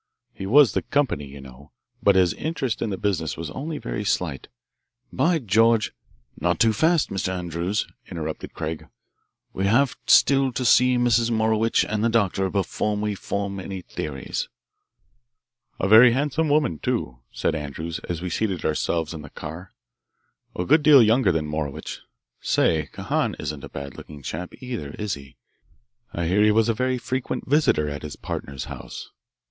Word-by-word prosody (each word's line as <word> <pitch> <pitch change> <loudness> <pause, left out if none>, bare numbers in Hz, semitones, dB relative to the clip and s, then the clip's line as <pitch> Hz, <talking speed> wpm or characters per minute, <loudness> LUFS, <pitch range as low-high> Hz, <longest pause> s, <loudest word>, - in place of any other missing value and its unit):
He 95 - -6
was 140 +4 +6
the - - 0
'company,' 125 - -1
you 70 0 -11
know, 65 +1 -14 0.3
but 100 -1 +4
his 90 -2 +4
interest 135 -7 -3
in - - -1
the 95 - -3
business 90 -8 -1
was 80 -2 -5
only 150 +3 -5
very 105 - -4
slight. 85 -8 -1 0.7
By 165 +6 +2
George 115 - +3 0.2
" - - -23
"Not 85 +1 +1
too 115 -1 +4
fast, 160 +7 +2
Mr. 95 -1 -1
Andrews," 90 +2 -2 0.2
interrupted 80 -3 -6
Craig. 80 +1 -5 0.7
"We 95 +1 0
have 125 +6 +3
still 135 -1 +5
to 125 - -2
see 125 +1 +5
Mrs. 120 -1 +3
Morowitch 110 0 +2
and 105 0 -1
the 115 - +3
doctor 100 -4 +1
before 100 +2 -1
we 105 0 -1
form 100 0 -3
any 95 0 -6
theories." 70 -6 -5 1.3
"A 95 - +1
very 115 +4 +8
handsome 150 +4 0
woman, 145 - +2
too," 60 -1 -2
said - - -1
Andrews, 80 +2 -5
as 85 0 -3
we 90 - -2
seated 95 -6 -1
ourselves 80 +1 -1
in 80 - -7
the 75 - -10
car: 80 +7 -8 0.8
"A 90 - -2
good 155 +3 +5
deal 145 -4 +8
younger 110 -2 +4
than 80 -2 -1
Morowitch. 75 -2 -4 0.4
Say, 75 -3 +1
Kahan - - -1
isn't 75 -2 -5
a - - -8
bad 70 -1 -8
looking 75 -2 -11
chap, 90 +6 -5
either, 110 - -5
is 105 -2 -2
he? 70 -3 -10 0.7
I 85 - -3
hear 95 +5 +2
he 105 - +5
was 110 +2 +3
a - - +3
very 130 +3 0
frequent 130 +1 -3
visitor 140 - +3
at 70 0 -5
his 75 -2 -7
partner's 70 -2 -5
house. - - -9
100 Hz, 170 wpm, -24 LUFS, 80-120 Hz, 1.3 s, very